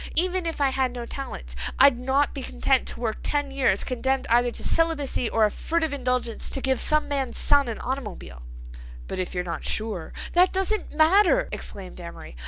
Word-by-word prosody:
Even 365 0 +2
if 325 - -3
I 280 -1 +3
had 260 -2 0
no 240 -1 -5
talents 60 - -7 0.2
I'd 270 -3 +6
not 265 +3 +1
be 275 - -5
content 265 0 +1
to - - -7
work 225 -2 -2
ten 290 -1 -1
years, 270 -1 +1
condemned 265 +1 -1
either 240 +1 +4
to - - -6
celibacy 300 -7 +1
or 225 -1 +3
a 210 - 0
furtive 320 -2 -1
indulgence, 250 -4 -1
to - - -4
give 265 -1 +1
some 305 0 +3
man's 270 -4 -2
son 285 -2 +4
an 230 - -4
automobile." 210 - -6 0.7
"But, - - -5
if 185 0 -4
you're 180 - -1
not 175 - -5
sure—" 215 -7 -3 0.2
"That 360 +1 +5
doesn't 385 +1 -1
matter," 395 +10 +4
exclaimed 185 -2 -6
Amory. 170 - -10
265 Hz, 190 wpm, -25 LUFS, 230-295 Hz, 0.7 s, I'd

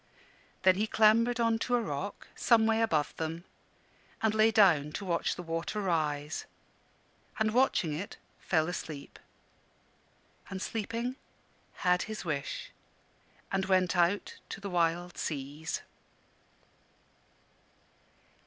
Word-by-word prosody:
Then 185 0 +6
he 215 +2 +1
clambered 230 +3 +4
on 230 -1 +2
to 245 +1 +1
a - - +3
rock, 190 +4 -5
some 225 -2 +4
way 225 0 +3
above 160 -10 +1
them, 165 +1 -3 0.8
and 220 -1 +3
lay 220 +1 +5
down 175 -10 +4
to 200 - -4
watch 170 -2 0
the 180 - -7
water 165 +5 -3
rise; 155 -5 -1 0.9
and 220 -1 +1
watching 230 - +2
it, 180 +7 -5 0.2
fell 160 -3 +1
asleep; 155 -5 -6 1.3
and 195 -1 -4
sleeping, 230 +5 -3 0.7
had 180 0 +4
his 215 -3 -5
wish, 145 -4 -3 0.8
and 190 -1 0
went 185 -2 +3
out 175 +3 +1
to - - -6
the 200 -1 -6
wide 175 0 0
seas. 145 +2 -4
185 Hz, 115 wpm, -31 LUFS, 165-220 Hz, 1.3 s, Then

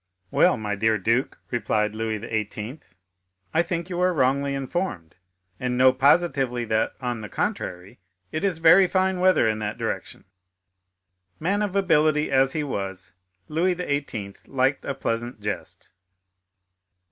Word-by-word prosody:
"Well, - - +4
my 105 -2 -3
dear 110 +2 +2
duke," 115 +7 0
replied 105 -3 0
Louis 110 0 -2
XVIII., 110 +4 -4 0.7
"I 165 - +4
think 170 -1 -3
you 180 -1 -3
are 185 0 +4
wrongly 140 -2 +1
informed, 135 - -3 0.5
and 125 -1 -1
know 130 0 +6
positively 135 -3 +2
that, 110 0 0
on 120 -3 -3
the 105 - -7
contrary, 100 - -4 0.3
it 155 - -3
is 190 -5 +1
very 165 +4 +6
fine 190 0 +1
weather 185 -9 +4
in 110 0 0
that 105 0 -3
direction." - - -4 1.1
Man 195 +6 0
of 205 -2 -2
ability 155 -6 +3
as 135 0 +3
he 155 - -1
was, 95 -8 -5 0.3
Louis 175 +4 +1
XVIII. 140 - -3
liked 135 +1 0
a 140 - -2
pleasant 120 -2 -3
jest. 105 0 -6
130 Hz, 140 wpm, -24 LUFS, 110-165 Hz, 1.1 s, know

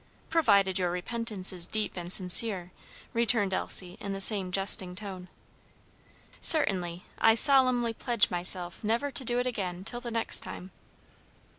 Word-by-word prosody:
"Provided 200 - 0
your 180 -1 -3
repentance 195 +1 0
is 175 -2 +3
deep 215 -1 -5
and 175 -1 -7
sincere," 185 0 +2 0.4
returned 230 -4 -1
Elsie 180 0 0
in 200 -1 -7
the 195 - -7
same 195 -2 +3
jesting 190 -1 -1
tone. 190 -2 -10 1.1
"Certainly, 180 - +2 0.2
I 225 0 +2
solemnly 255 -3 +4
pledge 235 -1 -1
myself 175 +1 -2
never 235 +7 -3
to 270 - 0
do 240 0 -1
it 245 - -3
again 185 -7 -6
till 240 +5 -6
the 240 - -7
next 230 -1 +3
time." 185 +1 -11
200 Hz, 145 wpm, -26 LUFS, 180-235 Hz, 1.1 s, solemnly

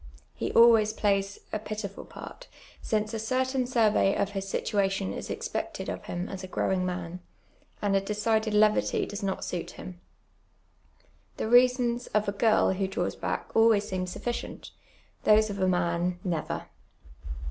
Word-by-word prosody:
lie - - -1
always 225 -2 +6
plays 200 -2 0 0.2
a 215 - 0
pkiful 205 -1 -6
part, - - -10 0.3
since 215 -1 -1
a 225 - -2
certain 255 +2 0
survey 220 -5 +3
of 200 0 0
his 195 -1 -4
situation 195 - 0
is - - -6
expected - - -4
of - - -5
him 175 +1 -4
as 190 -1 -7
a - - -5
^rowin^ 185 0 0
man, 180 -1 -4 0.6
and 200 -1 +2
a 195 - +3
decided 215 +2 0
levity 210 0 +3
does 205 +1 -6
not 195 -1 -2
suit 175 -2 -4
him. 180 -1 -9 1.4
The - - -2
rea.sons 245 0 +4
of 210 -1 +2
a - - +1
girl 215 +1 +3
who 190 0 -1
(haws 190 - -2
back - - -4
always 225 -2 +4
seem 185 -1 -2
sufficient, 240 +6 -5 0.5
those 215 0 +5
of 200 - -5
a 185 - +2
man 175 0 0
—never. 170 -4 -3
205 Hz, 155 wpm, -28 LUFS, 190-220 Hz, 1.4 s, always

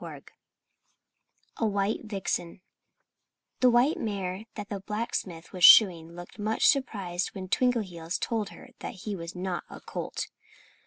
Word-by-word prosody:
XVII - - -8 1.3
A 225 - +1
WHITE 205 +2 -1
VIXEN 190 -4 -3 1.0
The 255 - +6
white 245 +6 +3
mare 195 -1 -3
that 205 -1 -6
the 200 - -3
blacksmith 195 -5 -4
was 180 -2 -4
shoeing 170 -6 +8
looked 175 +4 -11
much 215 +1 +1
surprised 200 - +1
when 190 -1 -6
Twinkleheels 185 -8 0
told 220 -3 -2
her - - -13 0.2
he 205 +1 -6
was 170 0 -7
not 180 -1 -3
a - - -9
colt. - - -5
195 Hz, 135 wpm, -28 LUFS, 180-220 Hz, 1.3 s, shoeing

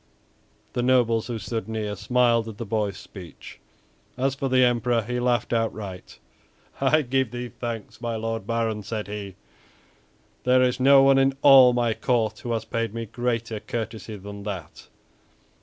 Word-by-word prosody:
The 125 - -1
nobles 120 -3 +2
who 120 -2 -3
stood 110 0 -4
near 105 -2 -3
smiled 115 +2 +2
at 105 - -10
the 115 - -5
boy's 105 -1 -1
speech. 90 -4 -12 0.6
As 135 +1 +1
for 135 -1 -3
the 130 0 +4
Emperor, 120 -1 +2
he 125 +3 -3
laughed 120 -1 0
outright. 110 -5 -3 0.6
"I 150 +3 +3
give 130 -1 0
thee 120 +1 -6
thanks, 115 -2 -7
my 115 -1 -2
Lord 115 -2 -4
Baron," 115 -2 -1
said 105 +1 -5
he; 100 -2 -6 1.1
"there 130 0 +4
is 125 0 +1
no 135 +1 +7
one 135 0 +5
in 135 0 +2
all 135 -3 +9
my 120 -2 +1
court 115 -2 0
who 120 - -5
has 115 -1 -2
paid 115 -1 -3
me 115 0 -3
greater 115 -1 -2
courtesy 110 -1 -5
than 100 +1 -9
that." 95 -6 -7
115 Hz, 160 wpm, -25 LUFS, 110-125 Hz, 1.1 s, all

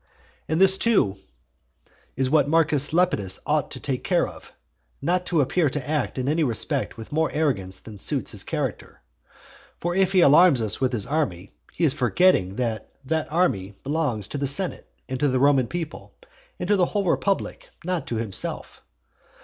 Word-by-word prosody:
And 160 +2 +1
this, 190 0 +5
too, 195 - +2 1.0
is 130 +1 0
what 145 0 +3
Marcus 155 -3 +2
Lepidus 155 - +1
ought - - 0
to - - -8
take - - -3
care - - +1
of, - - -13 0.5
not 180 +1 -1
to 165 -4 +2
appear 155 +3 +1
to 135 -1 -5
act 150 -4 -1
in 130 0 -2
any 155 +3 +2
respect 120 -7 -1
with 115 - -10
more 160 +1 +1
arrogance 95 -12 -1
than 105 -1 -12
suits - - -2
his - - -3
character. - - -4 0.8
For 175 +1 -2
if 190 0 +2
he 185 - +5
alarms 155 -1 +6
us 110 +1 -1
with 130 - +2
his 110 -5 -1
army, 120 - -2 0.2
he - - -4
is 150 -5 +4
forgetting 125 - +2
that 115 -3 -3 0.2
that 160 +2 -2
army 100 - 0
belongs 140 -8 -1
to 145 - -4
the 140 - -1
senate, 175 +7 -1 0.2
and 130 -1 -4
to 145 - +2
the 130 -1 +1
Roman 135 -2 +4
people, 150 - -6 0.4
and 180 - -4
to 205 - +4
the 180 -2 +3
whole 205 -2 -1
republic, 195 +2 -1 0.2
not 180 -5 -2
to 120 - -3
himself. 110 -3 -2
145 Hz, 180 wpm, -24 LUFS, 120-170 Hz, 1.0 s, alarms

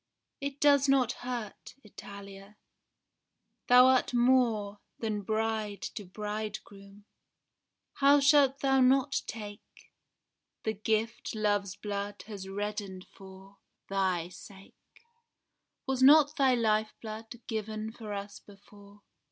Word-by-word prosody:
It 280 0 -5
does 285 -1 +4
not 260 -3 +3
hurt, 245 -5 -7
Italia. 200 -1 -12 1.1
Thou 250 +1 +8
art 260 -1 +3
more 235 -5 +2 0.2
Than 215 -2 -3
bride 220 0 -2
to 205 - -7
bridegroom; 205 0 -7 0.9
how 285 +1 +5
shalt 280 -1 +4
thou 270 -1 +3
not 260 +1 +3
take 205 -2 -7 1.0
The 220 - -1
gift 220 +3 -2
love's 205 -2 0
blood 205 0 -5
has 200 -3 -8
reddened 200 -2 -5
for 195 +1 -14 0.3
thy 185 -3 0
sake? 190 +2 -14 1.1
Was 265 -1 -2
not 295 +2 +7
thy 265 -4 +3
lifeblood 220 0 -2
given 220 -1 -4
for 220 -2 -9
us 200 0 -6
before? 205 0 -18
215 Hz, 105 wpm, -30 LUFS, 200-250 Hz, 1.1 s, Thou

